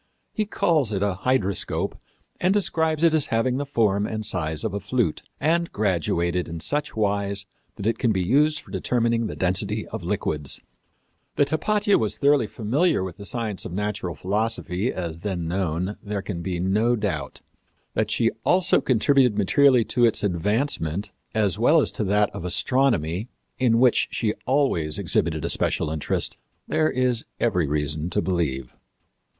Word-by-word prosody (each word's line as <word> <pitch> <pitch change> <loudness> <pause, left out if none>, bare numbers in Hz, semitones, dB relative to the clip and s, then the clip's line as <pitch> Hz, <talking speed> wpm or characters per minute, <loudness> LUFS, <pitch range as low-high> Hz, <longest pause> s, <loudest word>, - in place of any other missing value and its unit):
He 215 -1 -1
calls 155 - +1
it 100 0 0
a 100 -1 +1
hydroscope 115 -7 0 0.4
and 180 +1 +2
describes 160 -5 +1
it 165 -1 +5
as 155 -3 +3
having 115 +3 +1
the 140 0 -3
form 105 -6 +1
and 110 -1 -4
size 80 -5 -2
of 110 - -2
a 100 - -2
flute, 105 -4 -1 0.2
and 170 +3 +1
graduated 90 -3 0
in 85 0 -6
such 150 - -2
wise 100 -2 -1 0.3
that 100 - -7
it 115 0 0
can 120 - +2
be 95 -3 0
used 150 - +2
for - - -17
determining 115 -2 0
the - - -6
density 95 +4 0
of 110 - -5
liquids. 80 -6 -1 0.8
That 145 -1 +2
Hypatia 205 +6 +2
was 110 -2 -1
thoroughly 140 -5 +3
familiar 130 - +1
with 95 -2 -6
the 100 - -7
science 110 -5 -3
of 85 - -6
natural 100 -3 -3
philosophy, 105 +1 -1
as 85 -3 -5
then 90 -3 -3
known, 90 +2 -2
there 100 -2 -4
can 85 -5 -5
be 90 0 -3
no 105 +7 +2
doubt. 85 - -3 0.5
That 110 -1 0
she 115 +1 +2
also 180 0 +3
contributed 125 -1 +3
materially 125 +4 +4
to 120 -1 +4
its 115 - +1
advancement, 100 - -1 0.2
as 105 -2 +1
well 150 +8 +5
as - - +1
to - - -3
that 105 +2 +2
of - - -7
astronomy, 100 - +1 0.3
in 120 -3 +3
which 125 0 +4
she 110 -2 -1
always 125 - +1
exhibited - - 0
a - - -1
special 75 - 0
interest, 80 -2 -1 0.3
there 155 0 +2
is 125 -2 +1 0.2
every 90 -9 +1
reason 75 +2 -2
to 105 - 0
believe. 70 -9 -1
105 Hz, 165 wpm, -24 LUFS, 90-130 Hz, 0.8 s, it